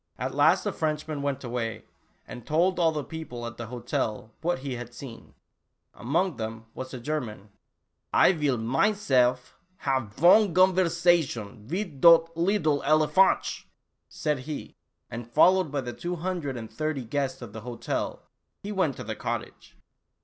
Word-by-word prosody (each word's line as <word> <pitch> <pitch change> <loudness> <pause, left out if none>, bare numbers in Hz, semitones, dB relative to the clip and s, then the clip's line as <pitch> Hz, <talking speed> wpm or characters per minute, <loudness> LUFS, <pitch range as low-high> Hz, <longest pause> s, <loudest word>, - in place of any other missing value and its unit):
At - - -3
last - - +4
the - - -2
Frenchman 155 -1 -2
went 140 -1 -2
away, 115 -3 -4 0.4
and 120 - -9
told 175 +6 +1
all 165 -2 +4
the 150 -2 -3
people 135 -7 -7
at 115 0 -7
the 120 - -6
hotel 115 -2 -3
what 175 +2 0
he 135 - -2
had 120 0 -7
seen. 120 -5 -11 0.6
Among 165 +5 -1
them 110 0 -5
was 130 0 -7
a 130 - -6
German. 120 -7 -4 0.3
" - - -52 0.2
I - - +6
vill 150 -7 0
minezelf 130 - +1 0.2
haf 130 - -1
von 185 +4 +5
o^onverzazhuns 170 - +2
mit 175 -6 -4
dot 165 -1 +7
leedle 165 -4 +1
elephantchen," 155 +6 +3 0.4
said 150 -3 -1
he, 150 - -6 0.4
and 120 0 -6
followed 180 +5 +4
by 145 -2 -1
the 120 -2 -6
two 175 +1 -4
hundred 165 -6 -3
and 110 -2 -8
thirty 155 -1 -2
guests 130 +1 -2
of 110 -3 -10
the 110 - -7
hotel, 120 +1 -4 0.4
he 205 - -5
went 185 -9 0
to - - -6
the - - -5
cottage. - - -6
145 Hz, 155 wpm, -27 LUFS, 120-170 Hz, 0.6 s, dot